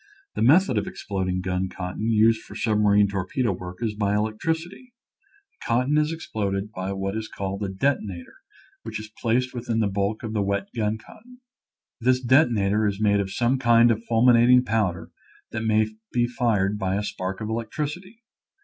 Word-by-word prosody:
The - - -4
method 130 - +4
of 100 - -5
exploding 95 -2 -3
gun 90 0 -2
cotton 95 +5 -4
used 110 0 +4
for - - -13
submarine 105 -2 +3
torpedo 100 +5 -1
work 90 +3 -7
is 110 -2 -1
by 105 -1 0
electricity. 160 - -3 0.6
The - - -16
cotton 125 +5 +1
is 150 +1 +2
exploded 105 -10 -3
by 95 -1 -4
what 95 +1 -3
is 110 0 -3
called 100 +1 -5
a 100 - -2
detona 95 -4 -1
tor, - - -19 0.5
which - - -6
is 110 0 -9
placed 125 +3 +1
within 120 -2 -2
the 110 - +2
bulk 100 +2 -1
of 110 -1 -4
the 105 - 0
wet 100 0 -1
gun 110 -1 0
cotton. 245 - -17 0.6
This 125 +1 +2
detonator 115 -6 +3
is 100 -1 -2
made 100 -1 +3
of 100 -1 -2
some 125 +4 +1
kind 120 -1 +5
of 115 0 -2
fulminating 120 +2 +5
powder 95 -7 -1 0.4
that 110 - -3
may 110 0 +3 0.3
be 120 -1 +2
fired 105 -4 0
by 95 -1 -1
a 105 - -1
spark 95 -2 -4
of 110 -1 -4
electricity. 150 - -5
110 Hz, 175 wpm, -24 LUFS, 100-120 Hz, 0.6 s, kind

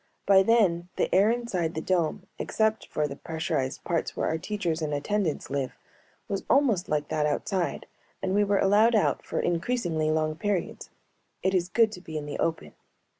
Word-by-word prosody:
By 195 -1 +6
then 190 -5 +2
the - - -1
air 195 +3 +5
inside 200 -9 -1
the - - -1
dome 180 +2 0
except 220 0 0
for 150 -1 -1
the 140 - -7
pressurized 160 -4 -3
parts 170 -2 -2
where - - 0
our 160 - -1
teachers 175 -5 -2
and 150 -1 -1
attendants 165 0 -1
live 135 -2 -2 0.5
was 195 -1 -3
almost 235 -10 +3
like 150 -1 -1
that 155 -1 +1
outside, 175 +4 -1 0.3
and 190 0 -2
we 205 +1 +4
were 200 0 +2
allowed 210 +4 +4
out 215 - +2
for - - -3
increasingly 175 -3 0
long 155 0 0
periods. 205 0 -2 0.5
It 190 +1 +2
is 180 -1 +1
good 225 +1 +3
to 180 - -9
be 160 -3 -6
in 150 - -4
the 145 - -5
open. 165 -1 -2
175 Hz, 180 wpm, -27 LUFS, 155-205 Hz, 0.5 s, By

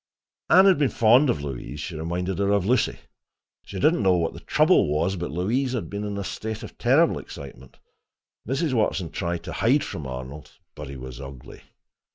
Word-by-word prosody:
Anne 190 +2 +7
had 190 -5 +5
been 140 -3 +3
fond 120 +6 +4
of 75 -10 0
Louise—she 75 +5 -6
reminded 85 +4 -3
her 100 0 +1
of 100 -2 +2
Lucy. 120 +2 +1 0.7
She 95 - -7
did 155 - +4
not 175 - -1
know 95 -2 +4
what 85 -2 0
the - - -9
trouble - - +3
was, 75 +6 0
but 85 -1 -4
Louise 115 - -1
had 125 - -4
been 100 +1 -4
in 105 -1 -4
a 100 - -3
state 110 +3 -5
of - - -10
terrible 140 +8 +3
excitement. 65 -2 -11 0.7
Mrs. 135 +3 0
Watson 100 -7 0
tried 85 -1 -3
to 85 - -6
hide 130 +8 +2
from 75 -4 -6
Arnold, 65 +3 -8 0.2
but 75 -2 -8
he 70 - -7
was 65 +1 -8
ugly. 65 -2 -10
95 Hz, 195 wpm, -25 LUFS, 75-120 Hz, 0.7 s, Anne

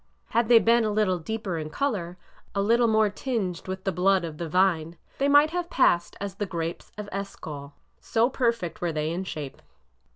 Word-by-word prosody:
Had 235 0 +2
they 240 - +9
been 230 +1 +4
a 215 - +1
little 205 -4 +1
deeper 195 -1 -3
in 155 0 -5
color, 185 - -2 0.4
a 200 - +2
little 235 +3 +4
more 220 -2 +3
tinged 200 -9 -3
with 190 0 -5
the 195 - 0
blood 185 +1 +2
of 155 -2 -8
the 170 -2 -4
vine, 170 -2 +1 0.2
they 275 - +2
might 290 +2 +6
have 350 0 -2
passed 175 - +2
as 200 -1 -4
the 205 +1 -4
grapes 165 -2 -4
of 210 -1 -6
Eshcol,— 150 -7 -6 0.2
so 230 +1 +2
perfect 235 -9 -1
were 175 -1 0
they 155 0 -2
in 180 +3 -2
shape. 150 -6 -6
195 Hz, 195 wpm, -26 LUFS, 170-230 Hz, 0.4 s, they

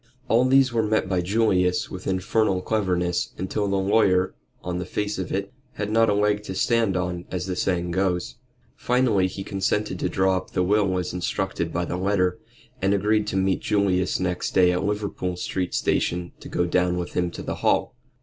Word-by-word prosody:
All 120 +2 +4
these 130 -1 +4
were 115 - +2
met 110 -2 +1
by 95 -2 0
Julius 90 -2 +1
with 90 - -7
infernal 95 0 +1
cleverness, 90 -5 0
until 100 +3 -2
the 100 0 0
lawyer 95 -1 +3 0.3
on 90 0 -3
the 90 - -4
face 105 +1 -2
of 95 - -4
it 100 +2 -3 0.2
had 105 0 -3
not 115 0 +4
a - - +3
leg 105 0 +2
to 95 - -5
stand 110 -1 +2
on, 90 -1 -3
as 90 -1 -3
the 95 -1 -3
saying 90 -1 -1
goes. 90 -1 -1 0.4
Finally 120 -7 +2
he 95 +1 -6
consented 95 +2 -1
to - - -1
draw 95 -1 +2
up 95 - -7
the 90 - +1
will 100 -1 +2
as 90 -1 -3
instructed 90 -1 -2
by 90 +1 -1
the 85 - -3
letter, 90 -1 +1 0.4
and 100 +1 +2
agreed 105 +1 +1
to 95 - -1
meet 95 -1 +1
Julius 95 -3 +1
next 90 -1 -2
day 90 -1 +5
at 90 - -1
Liverpool 100 -3 -2
Street 90 0 -3
Station 85 0 0
to - - -10
go 90 - 0
down 90 0 +1
with 90 -1 -4
him 90 -1 0
to - - -8
the - - -4
Hall. - - +2
95 Hz, 195 wpm, -24 LUFS, 90-105 Hz, 0.4 s, day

